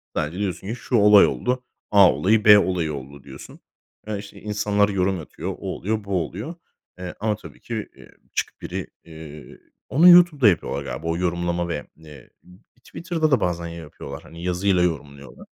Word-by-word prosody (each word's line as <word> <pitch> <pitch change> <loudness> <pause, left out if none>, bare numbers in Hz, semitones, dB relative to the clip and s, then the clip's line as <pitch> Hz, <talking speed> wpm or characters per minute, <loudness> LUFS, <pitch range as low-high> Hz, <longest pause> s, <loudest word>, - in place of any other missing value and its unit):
Sadece, 80 +4 -2
diyorsun 95 -1 -3
ki: 110 - -3
"Şu 125 - -3
olay 105 -2 +7
oldu. 125 0 -2 0.3
A 100 -4 +7
olayı, 105 +3 +2
B 105 -1 +9
olayı 90 -5 -1
oldu." 70 0 -9
diyorsun. 70 -1 -12 0.5
Iıı, 105 -1 -3
işte, 100 0 -12
insanlar 105 -1 +1
yorum 95 -1 0
atıyor, 80 - -7
o - - -7 0.2
oluyor, 110 +3 -3
bu 100 -3 -1
oluyor. 110 - -7 0.4
Eee, 90 -1 -7
ama, 105 0 0
tabii 105 - -14
ki, 115 -3 -5
ııı, - - -15 0.3
çıkıp - - -3
biri, - - -5 0.2
iii, 80 -2 -12 0.3
onu 165 +6 +6
YouTube'da 175 -8 +7
yapıyorlar 70 -6 -2
galiba 70 +4 -6
o 85 0 -1
yorumlama 85 0 -1
ve, 75 -3 -4
eee, 75 -5 -15 0.5
Twitter'da 165 -3 -2
da 130 - +4
bazen, 85 -2 -2
ya 85 - -8
yapıyorlar, 75 -2 -9
hani, 85 +1 -12
yazıyla 90 +1 +1
yorumluyorlar. 70 -5 -5
90 Hz, 175 wpm, -23 LUFS, 80-105 Hz, 0.5 s, B